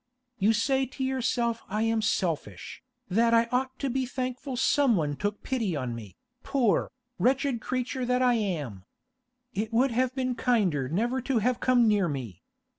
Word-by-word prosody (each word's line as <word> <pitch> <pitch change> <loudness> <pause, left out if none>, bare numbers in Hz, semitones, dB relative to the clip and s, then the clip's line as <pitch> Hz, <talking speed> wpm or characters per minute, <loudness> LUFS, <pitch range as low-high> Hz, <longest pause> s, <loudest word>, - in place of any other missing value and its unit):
You 205 +3 +4
say 265 +4 +1
to 265 +2 -6
yourself 245 -3 0
I 215 +2 0
am 225 0 +1
selfish, 165 - -2 0.3
that 230 +4 +3
I 230 0 +5
ought 260 +1 -1
to 275 - -2
be 260 0 -1
thankful 255 +1 -4
someone 225 - +2
took 205 +5 -3
pity 225 -10 -1
on 130 -4 -3
me, 110 -5 -9 0.3
poor, 250 -7 +1 0.3
wretched 265 -1 +1
creature 255 +1 -2
that 250 +1 +2
I 250 -1 +4
am. 155 - -2 0.7
It 215 +3 -2
would 250 +3 +3
have 255 +2 0
been 255 -2 0
kinder 195 - +1
never 235 - 0
to 255 0 0
have 240 +3 +1
come 245 -2 +4
near 205 -4 +3
me. 125 - -6
235 Hz, 165 wpm, -28 LUFS, 195-255 Hz, 0.7 s, I